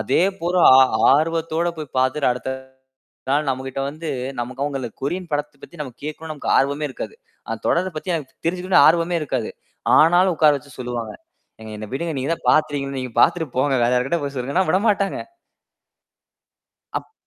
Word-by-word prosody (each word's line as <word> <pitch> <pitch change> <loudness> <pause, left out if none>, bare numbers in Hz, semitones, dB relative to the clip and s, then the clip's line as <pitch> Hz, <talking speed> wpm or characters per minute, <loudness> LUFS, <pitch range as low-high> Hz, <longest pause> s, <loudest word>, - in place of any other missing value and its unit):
அதேபோல 185 -1 0 0.2
ஆ, - - +9 0.3
ஆர்வத்தோட 165 +2 0
போய் 150 -4 -8
பாத்துட்டு, 130 +2 +2
அடுத்த 125 +1 -5 0.8
நாள் 145 +1 +1
நம்மக்கிட்ட 130 0 -3
வந்து 155 +2 -7 0.3
நமக்கு 130 +3 -5
அவுங்கள 135 -4 -3
கொரியன் 175 +5 -3
படத்தப் 145 -1 -3
பத்தி 170 - -12
நம்ம 130 -5 -5
கேக்கணுன்னு 155 +1 -6
நமக்கு 150 - -2
ஆர்வமே 140 +2 0
இருக்காது. 130 - -7 0.3
அந்தத் - - -5
தொடரப் 175 -1 0
பத்தி 180 +4 -3
எனக்கு 150 -5 -6
தெரிஞ்சுக்கணுன்னு 180 -3 +3
ஆர்வமே 170 +1 +3
இருக்காது. 130 -6 -2 0.5
ஆனாலும் 175 +3 +5
உக்கார 155 -1 +5
வச்சு 140 +1 -12
சொல்லுவாங்க. 120 -3 -4 0.5
"ஏங்க 110 0 -9
என்ன 105 0 -7
விடுங்க. 165 +4 -2
நீங்கதான் 145 +6 -3
பாத்துடீங்கள்ல!" 145 -3 +1
நீங்கப் 125 -2 -5
பாத்துட்டு 165 -3 +3
போங்க. 140 +2 +2
வேற 120 - +2
யாருக்கிட்ட 135 +7 0
போய் 140 - -5
சொல்லுங்கன்னா, 140 +9 0
விடமாட்டாங்க. 200 +1 +1 1.8
அப் - - -19
150 Hz, 155 wpm, -21 LUFS, 130-170 Hz, 1.8 s, ஆ